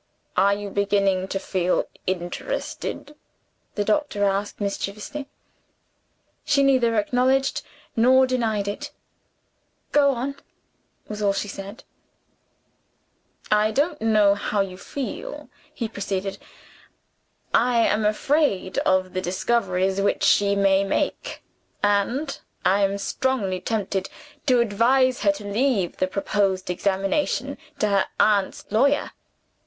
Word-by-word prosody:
"Are 200 Hz, +1 st, +4 dB
you 205 Hz, -1 st, -6 dB
beginning 195 Hz, -2 st, +1 dB
to 195 Hz, -, -2 dB
feel 185 Hz, -2 st, 0 dB, 0.2 s
interested?" 185 Hz, -, -4 dB, 0.6 s
the 205 Hz, -, 0 dB
doctor 215 Hz, -2 st, 0 dB
asked 200 Hz, +1 st, -1 dB
mischievously. 210 Hz, +8 st, -4 dB, 1.1 s
She 280 Hz, -1 st, +3 dB
neither 255 Hz, -4 st, +3 dB
acknowledged 255 Hz, +5 st, +1 dB, 0.3 s
nor 260 Hz, +3 st, +5 dB
denied 225 Hz, -5 st, -1 dB
it. 205 Hz, -, -4 dB, 1.0 s
"Go 285 Hz, -1 st, +5 dB
on" 275 Hz, +2 st, -2 dB, 0.7 s
was 210 Hz, 0 st, -6 dB
all 200 Hz, -1 st, +2 dB
she 200 Hz, +1 st, -2 dB
said. 195 Hz, +2 st, -8 dB, 1.7 s
"I 210 Hz, 0 st, +4 dB
don't 295 Hz, +7 st, 0 dB
know 215 Hz, -2 st, +4 dB
how 205 Hz, +1 st, -2 dB
you 190 Hz, -2 st, -4 dB
feel," 285 Hz, -, -6 dB, 0.2 s
he 230 Hz, -, -4 dB
proceeded; 195 Hz, -2 st, -4 dB, 1.1 s
"I 240 Hz, -1 st, +4 dB
am 215 Hz, -, +1 dB
afraid 215 Hz, -2 st, +1 dB
of 185 Hz, 0 st, +1 dB
the 185 Hz, -, -1 dB
discoveries 190 Hz, 0 st, 0 dB
which 200 Hz, -, +1 dB
she 200 Hz, 0 st, +4 dB
may 195 Hz, -1 st, +3 dB
make; 195 Hz, -, -2 dB, 0.4 s
and 205 Hz, +9 st, +1 dB, 0.3 s
I 195 Hz, +2 st, +4 dB
am 200 Hz, 0 st, +1 dB
strongly 200 Hz, -3 st, -1 dB
tempted 200 Hz, -3 st, -2 dB, 0.4 s
to 250 Hz, -3 st, +5 dB
advise 245 Hz, +4 st, +2 dB
her 200 Hz, -, +4 dB
to 205 Hz, +1 st, -9 dB
leave 205 Hz, -3 st, 0 dB
the 185 Hz, -, +1 dB
proposed 195 Hz, -1 st, 0 dB
examination 200 Hz, -, -1 dB, 0.2 s
to 240 Hz, -, +1 dB
her 200 Hz, -1 st, +2 dB
aunt's 200 Hz, -3 st, +2 dB
lawyer. 280 Hz, +7 st, +2 dB
205 Hz, 115 wpm, -24 LUFS, 195-255 Hz, 1.7 s, nor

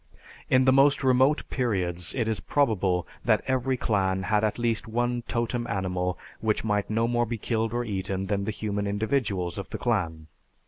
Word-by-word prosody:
In 130 Hz, 0 st, +4 dB
the 130 Hz, -, +6 dB
most 135 Hz, +1 st, +4 dB
remote 130 Hz, +3 st, +3 dB
periods 90 Hz, -8 st, -1 dB
it 115 Hz, -4 st, 0 dB
is 110 Hz, -2 st, 0 dB
probable 95 Hz, -10 st, +1 dB, 0.2 s
that -, -, +2 dB
every 130 Hz, 0 st, 0 dB
clan 95 Hz, -4 st, 0 dB
had 105 Hz, +3 st, +1 dB
at 110 Hz, -, 0 dB
least 115 Hz, -2 st, 0 dB
one 120 Hz, +2 st, 0 dB
totem 120 Hz, 0 st, -1 dB
animal 90 Hz, -3 st, -1 dB, 0.2 s
which 110 Hz, -1 st, 0 dB
might 105 Hz, -2 st, 0 dB
no 115 Hz, +2 st, +1 dB
more 120 Hz, 0 st, +1 dB
be 115 Hz, +1 st, -3 dB
killed 110 Hz, 0 st, -1 dB
or 120 Hz, +1 st, -1 dB
eaten 95 Hz, -2 st, -3 dB
than 100 Hz, 0 st, -1 dB
the -, -, -2 dB
human 105 Hz, -1 st, -2 dB
individuals 100 Hz, -4 st, -1 dB
of -, -, -7 dB
the -, -, -4 dB
clan. 85 Hz, -10 st, -1 dB
110 Hz, 180 wpm, -27 LUFS, 95-120 Hz, 0.2 s, the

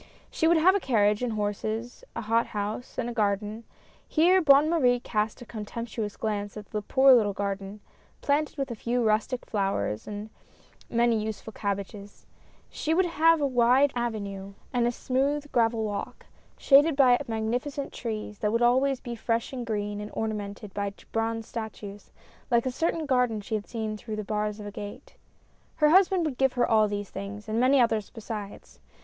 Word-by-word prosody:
She 320 Hz, -, +1 dB
would 335 Hz, 0 st, +5 dB
have 355 Hz, +4 st, +5 dB
a 400 Hz, -, +2 dB
carriage 210 Hz, -, +2 dB
and 245 Hz, -2 st, -1 dB
horses, 215 Hz, +3 st, -3 dB
a -, -, -3 dB
hot 230 Hz, +1 st, +1 dB
house 210 Hz, +4 st, -5 dB
and 245 Hz, -, -1 dB
a 240 Hz, -, -4 dB
garden 210 Hz, 0 st, -1 dB, 0.2 s
— -, -, -31 dB
here 360 Hz, +4 st, +6 dB
Bonne 285 Hz, -1 st, +6 dB
Marie 255 Hz, -7 st, +3 dB
cast 215 Hz, 0 st, -2 dB
a -, -, -13 dB
contemptuous 220 Hz, -1 st, -5 dB
glance 205 Hz, -1 st, -3 dB
at 210 Hz, -1 st, -10 dB
the 210 Hz, -, -2 dB
poor 265 Hz, +5 st, +5 dB
little 210 Hz, -5 st, +3 dB
garden, 200 Hz, +1 st, -4 dB, 0.4 s
planted 295 Hz, +2 st, 0 dB
with 275 Hz, -2 st, -2 dB
a -, -, -4 dB
few 240 Hz, +2 st, -1 dB
rustic 220 Hz, +3 st, 0 dB
flowers 195 Hz, -, -2 dB
and 210 Hz, +1 st, -6 dB, 0.6 s
many 235 Hz, -2 st, +2 dB
useful 220 Hz, 0 st, -6 dB
cabbages 200 Hz, 0 st, -5 dB, 0.2 s
— -, -, -32 dB
she 320 Hz, +1 st, -1 dB
would 375 Hz, +1 st, +3 dB
have 330 Hz, -1 st, +3 dB
a -, -, +2 dB
wide 255 Hz, +2 st, +4 dB
avenue 200 Hz, -5 st, -4 dB, 0.2 s
and 240 Hz, -1 st, +2 dB
a -, -, +1 dB
smooth 280 Hz, +4 st, -1 dB
gravel 225 Hz, -1 st, +2 dB
walk, 205 Hz, -2 st, -5 dB, 0.3 s
shaded 290 Hz, +2 st, +5 dB
by 255 Hz, -3 st, +5 dB
magnificent 245 Hz, +6 st, -3 dB
trees, 215 Hz, -3 st, -5 dB
that 210 Hz, -, 0 dB
would 230 Hz, +2 st, +1 dB
always 260 Hz, +2 st, +3 dB
be 240 Hz, -, -6 dB
fresh 230 Hz, +2 st, -2 dB
and 245 Hz, -3 st, -5 dB
green, 205 Hz, -1 st, -2 dB
and 210 Hz, -, -6 dB
ornamented 210 Hz, -2 st, -4 dB
by 200 Hz, -1 st, -2 dB, 0.2 s
bronze 225 Hz, 0 st, -1 dB
statues, 210 Hz, -3 st, -7 dB, 0.4 s
like 235 Hz, -1 st, +3 dB
a 260 Hz, -, 0 dB
certain 325 Hz, +4 st, -1 dB
garden 250 Hz, -5 st, +1 dB
she 205 Hz, +2 st, -7 dB
had 210 Hz, -1 st, -2 dB
seen 220 Hz, -2 st, -3 dB
through 215 Hz, 0 st, -6 dB
the 215 Hz, -, -4 dB
bars 210 Hz, 0 st, -2 dB
of 210 Hz, -, -7 dB
a 205 Hz, -, -6 dB
gate. 205 Hz, 0 st, -9 dB, 0.6 s
Her 300 Hz, -1 st, +4 dB
husband 370 Hz, 0 st, +4 dB
would 280 Hz, -5 st, -3 dB
give 265 Hz, -1 st, +3 dB
her 245 Hz, -1 st, +1 dB
all 215 Hz, -1 st, +4 dB
these 205 Hz, -1 st, -4 dB
things, 200 Hz, +2 st, -7 dB
and 220 Hz, +1 st, -1 dB
many 260 Hz, +3 st, +4 dB
others 225 Hz, -4 st, +2 dB
besides. 215 Hz, -3 st, -8 dB
225 Hz, 185 wpm, -27 LUFS, 210-255 Hz, 0.6 s, here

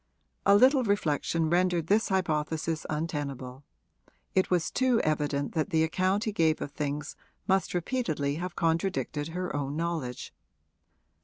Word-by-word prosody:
A 200 Hz, -, +7 dB
little 260 Hz, +5 st, +5 dB
reflection 165 Hz, -5 st, 0 dB
rendered 175 Hz, 0 st, +2 dB
this 210 Hz, +6 st, +2 dB
hypothesis 160 Hz, -3 st, -1 dB
untenable; 145 Hz, -4 st, -4 dB, 0.7 s
it 190 Hz, -, +2 dB
was 175 Hz, -3 st, +1 dB
too 255 Hz, -2 st, +2 dB
evident 145 Hz, -2 st, 0 dB
that 160 Hz, +3 st, 0 dB
the 160 Hz, -3 st, +2 dB
account 185 Hz, +5 st, +1 dB
he 215 Hz, -, -1 dB
gave 160 Hz, -5 st, +2 dB
of 145 Hz, -, -5 dB
things 145 Hz, 0 st, -4 dB, 0.3 s
must 190 Hz, -1 st, +1 dB
repeatedly 160 Hz, -, -1 dB
have 180 Hz, +2 st, -5 dB
contradicted 165 Hz, -3 st, 0 dB
her 180 Hz, 0 st, -4 dB
own 140 Hz, 0 st, -2 dB
knowledge. 160 Hz, -7 st, -3 dB
165 Hz, 135 wpm, -28 LUFS, 150-190 Hz, 0.7 s, A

